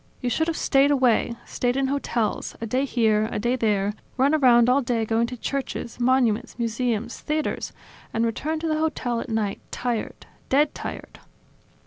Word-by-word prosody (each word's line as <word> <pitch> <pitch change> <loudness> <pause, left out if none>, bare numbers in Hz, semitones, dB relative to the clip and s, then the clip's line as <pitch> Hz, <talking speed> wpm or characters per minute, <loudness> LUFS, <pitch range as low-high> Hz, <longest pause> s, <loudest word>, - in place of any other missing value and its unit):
You 245 - -2
should 320 +6 +1
have 330 - -1
stayed 275 0 +3
away, 250 -4 +2
stayed 245 +1 -1
in 275 - +2
hotels, 255 -5 -1
a 230 - -4
day 255 +5 0
here, 220 -4 +2
a - - -2
day 240 +4 +1
there; 210 -4 +1 0.2
run 275 +3 +3
around 245 -6 +5
all 255 +3 +4
day 235 -3 0
going 225 +1 +1
to 250 +1 -7
churches, 260 -2 -4
monuments, 245 -2 +2
museums, 235 -1 -2
theaters, 305 +1 -2 0.4
and 225 +1 +1
returned 310 +8 -2
to 330 - -1
the 310 -1 0
hotel 255 -7 -1
at - - -7
night 215 -3 -1
tired, 240 -3 -3 0.2
dead 290 +3 +3
tired - - -7
245 Hz, 170 wpm, -24 LUFS, 230-275 Hz, 0.4 s, around